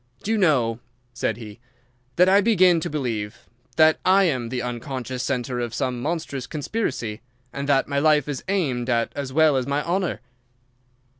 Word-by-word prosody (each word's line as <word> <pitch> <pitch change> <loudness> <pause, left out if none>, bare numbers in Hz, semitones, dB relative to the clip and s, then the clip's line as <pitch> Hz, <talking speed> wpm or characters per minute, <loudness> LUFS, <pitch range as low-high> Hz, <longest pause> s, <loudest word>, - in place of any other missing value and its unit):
"Do 215 - -2
you 225 - +2
know," 125 - +2 0.3
said 115 -2 -2
he, 110 -3 -10 0.6
"that 180 +1 +5
I 195 +2 +5
begin 185 -5 +4
to - - -4
believe 115 -8 -4 0.3
that 160 0 +5
I 195 +2 +5
am 130 -10 0
the 125 0 -3
unconscious 125 +1 -4
centre 125 -1 -2
of 120 -1 -3
some 125 -2 -2
monstrous 150 -3 -3
conspiracy, 145 - -3 0.3
and 140 +1 -4
that 135 -1 +3
my 140 -1 0
life 150 -1 +3
is 145 -3 -4
aimed 135 -11 -1
at 115 -1 0
as 140 -2 -4
well 155 0 +4
as 130 0 -2
my 140 +1 0
honour?" 180 +1 -1
140 Hz, 170 wpm, -23 LUFS, 120-160 Hz, 0.6 s, that